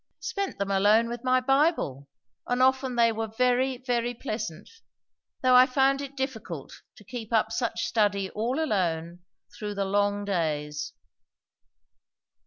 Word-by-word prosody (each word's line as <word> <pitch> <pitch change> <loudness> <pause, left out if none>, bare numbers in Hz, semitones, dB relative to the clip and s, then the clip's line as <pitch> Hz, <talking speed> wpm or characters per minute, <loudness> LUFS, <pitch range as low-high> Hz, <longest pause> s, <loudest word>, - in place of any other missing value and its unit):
"Spent 395 -1 -3
them 200 0 -2
alone 210 +4 +4
with 240 +1 -6
my 255 0 +3
Bible. 270 - +1 0.4
And 245 0 0
often 260 0 +2
they 230 -1 +4
were 225 0 -3
very, 250 +3 +1
very 245 -1 -1
pleasant; 215 - -5 0.8
though 255 0 +5
I 250 +1 +8
found 270 +1 +2
it 280 0 -8
difficult 220 - -5
to - - -16
keep 225 +1 -7
up 220 -1 +2
such 230 -1 -2
study 205 -3 +1
all 240 +7 -2
alone, 175 - -1 0.4
through 210 -1 -5
the 200 0 -1
long 205 +1 0
days." 150 -5 -2
225 Hz, 140 wpm, -27 LUFS, 200-255 Hz, 0.8 s, I